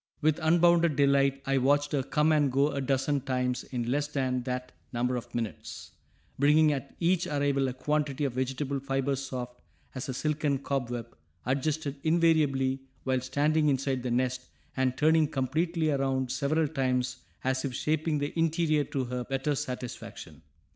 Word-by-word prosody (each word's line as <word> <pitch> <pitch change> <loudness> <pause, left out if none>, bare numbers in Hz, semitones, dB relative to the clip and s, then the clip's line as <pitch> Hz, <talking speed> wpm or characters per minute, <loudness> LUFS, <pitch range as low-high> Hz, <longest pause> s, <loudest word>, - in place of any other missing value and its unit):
With 155 0 +2
unbounded 170 0 +4
delight 140 -1 +3
I 135 0 +2
watched 145 +3 +2
her 145 - +1
come 150 +4 +1
and 145 -3 +3
go 140 +3 +2
a 140 - -2
dozen 135 +1 0
times 125 -2 -1
in 120 -2 -3
less 145 +2 0
than 130 -3 -1
that 125 0 -3 0.2
number 125 +1 0
of 120 0 -6
minutes, 115 -4 -5 0.5
bringing 150 +2 +5
at 140 0 -6
each 175 0 +2
arrival 140 -2 +1
a 130 - -3
quantity 145 +1 -1
of 135 - -2
vegetable 135 +2 -2
fiber 135 0 -1
soft 125 -2 -6 0.3
as 130 0 -5
a - - -1
silken 150 -1 0
cobweb, 120 -4 -3 0.3
adjusted 140 +2 -1
invariably 155 -5 +2 0.2
while 130 -1 0
standing 150 +4 +2
inside 135 -1 0
the 125 - -3
nest 125 +1 -1 0.3
and 130 -1 0
turning 160 0 +4
completely 155 +4 0
around 135 -2 0
several 155 +2 +1
times 130 -3 -1 0.3
as 130 0 0
if 130 -3 -3
shaping 155 +2 0
the 145 0 -2
interior 165 -2 +2
to 135 - -2
her 125 0 -3
better 135 +2 -1
satisfaction. 125 - -6
135 Hz, 160 wpm, -29 LUFS, 130-150 Hz, 0.5 s, bringing